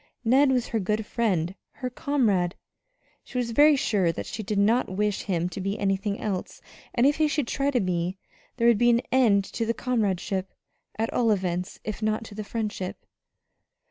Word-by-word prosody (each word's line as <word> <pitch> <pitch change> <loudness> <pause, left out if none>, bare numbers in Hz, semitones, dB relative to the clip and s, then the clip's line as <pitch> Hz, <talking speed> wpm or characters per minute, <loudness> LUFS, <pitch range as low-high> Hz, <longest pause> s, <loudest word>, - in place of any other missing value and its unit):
Ned 265 +4 +5
was 250 -2 0
her 225 - 0
good 210 +2 -1
friend 190 -7 0 0.2
her 255 -2 -5
comrade. 220 -11 +1 0.7
She - - -7
was 240 -2 -1
very 295 +5 +6
sure 200 -9 +1
that - - -6
she 220 - -5
did 210 0 -3
not 220 +5 +3
wish 205 +2 -1
him 175 -3 -1
to 190 - -6
be 195 +3 -2
anything 200 0 -1
else; 195 -4 -4 0.4
and 240 - +4
if 285 +2 +4
he 310 -1 +3
should 295 -4 -1
try 275 +3 0
to 260 -3 +1
be 180 -1 -1 0.4
there 235 -1 +3
would 235 -3 +5
be 240 - +5
an 235 +1 +3
end 230 -6 +4
to 230 - -1
the 230 +1 -1
comradeship, 195 -5 -1 0.4
at 225 +1 -1
all 235 -2 +2
events, 180 -3 -1
if 215 +1 -5
not 215 +1 0
to 220 - -11
the 215 +1 -5
friendship. 210 -4 -4
215 Hz, 190 wpm, -26 LUFS, 195-240 Hz, 0.7 s, very